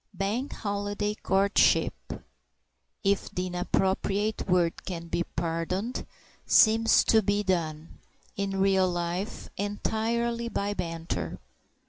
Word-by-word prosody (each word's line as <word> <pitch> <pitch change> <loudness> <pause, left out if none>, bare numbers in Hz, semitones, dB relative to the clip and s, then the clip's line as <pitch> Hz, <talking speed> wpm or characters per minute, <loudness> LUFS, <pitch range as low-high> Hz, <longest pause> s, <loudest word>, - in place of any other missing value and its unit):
Bank 210 +9 -2
Holiday 205 0 -2
courtship 195 -1 +3 1.1
(if 200 0 +1
the 180 - -3
inappropriate 195 +4 0
word 175 -2 +2
can 170 -3 -6
be 175 - 0
pardoned) 175 +8 -3 0.4
seems 225 0 +5
to 220 - +4
be 205 0 +1
done, 165 -4 -2 0.4
in 195 -1 -2
real 190 -1 +3
life, 175 +3 -3
entirely 230 +3 -1
by 205 -2 -1
banter. 165 -3 -4
195 Hz, 100 wpm, -28 LUFS, 180-210 Hz, 1.1 s, seems